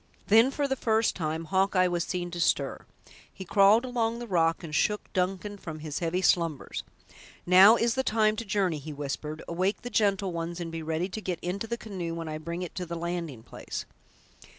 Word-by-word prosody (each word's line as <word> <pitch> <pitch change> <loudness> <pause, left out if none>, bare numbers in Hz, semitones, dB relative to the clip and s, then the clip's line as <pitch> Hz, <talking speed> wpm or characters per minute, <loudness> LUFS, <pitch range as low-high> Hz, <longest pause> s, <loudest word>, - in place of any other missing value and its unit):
Then, 225 +4 +7
for 285 +1 -1
the 265 - 0
first 225 -3 +1
time, 160 -1 -3
Hawkeye 190 +1 +2
was 175 -1 0
seen 175 0 -3
to 175 - -5
stir. 140 -4 0 0.4
He 190 - -9
crawled 205 +6 +5
along 235 -2 -1
the 240 - -6
rock 165 -5 +1
and 155 -2 -7
shook 210 +6 0
Duncan 195 +2 -2
from 160 -4 -7
his 155 -1 -5
heavy 175 +2 -1
slumbers. 165 -7 +1 0.6
"Now 190 +5 +8
is 235 0 +1
the 265 - +1
time 215 -3 +2
to 230 - -3
journey," 190 -6 0
he 150 +2 -7
whispered; 150 +2 -5
"awake 185 +6 -1
the 245 - -6
gentle 200 -4 +1
ones, 170 +1 -4
and 170 -1 -5
be 165 0 -5
ready 160 +3 -1
to 215 +4 -5
get 180 -4 -3
into 195 +5 -3
the 235 +1 -3
canoe 185 -7 -5
when 165 -1 -5
I 155 0 -4
bring 170 +3 -4
it 175 - -7
to 180 - -2
the 170 - -4
landing 170 -8 -4
place." - - -7
180 Hz, 205 wpm, -28 LUFS, 165-210 Hz, 0.6 s, Now